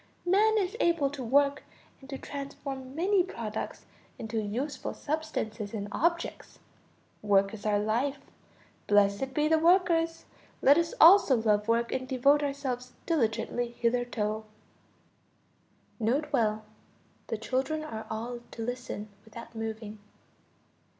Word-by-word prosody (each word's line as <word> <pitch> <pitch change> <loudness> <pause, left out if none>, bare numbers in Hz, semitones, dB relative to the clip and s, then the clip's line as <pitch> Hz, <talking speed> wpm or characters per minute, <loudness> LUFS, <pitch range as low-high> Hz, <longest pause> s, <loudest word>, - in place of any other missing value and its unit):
Man 425 +5 +4
is 390 0 0
able 330 - +2
to 280 -3 -6
work 280 +4 +3 0.4
and 270 - -14
to 270 - -4
transform 275 -2 -7
many 375 +4 +3
products 230 - -5 0.3
into 220 -1 -3
useful 245 +8 -4
substances 235 -9 -3
and 205 -1 -4
objects. 335 +6 -1 0.6
Work 195 -1 +3
is 215 -1 -5
our 205 -1 +3
life. 235 +7 0 0.7
Blessed 205 +5 +2
be 300 0 +2
the 320 0 +4
workers! 335 -1 +3 0.3
Let 285 +4 +6
us 335 -1 -1
also 335 -4 +8
love 210 -1 +1
work 235 +1 +1
and 260 0 -2
devote 280 +3 +3
ourselves 270 -3 -3
diligently 235 -4 -1
thereto. 230 -3 0 1.6
(N.B. 270 +8 +1 1.0
The 225 - -2
children 265 +7 -1
are 220 -7 -6
all 235 +2 -4
to 230 - -6
listen 245 -4 -5 0.2
without 230 +2 -11
moving.) 220 -1 -5
255 Hz, 120 wpm, -29 LUFS, 220-300 Hz, 1.6 s, also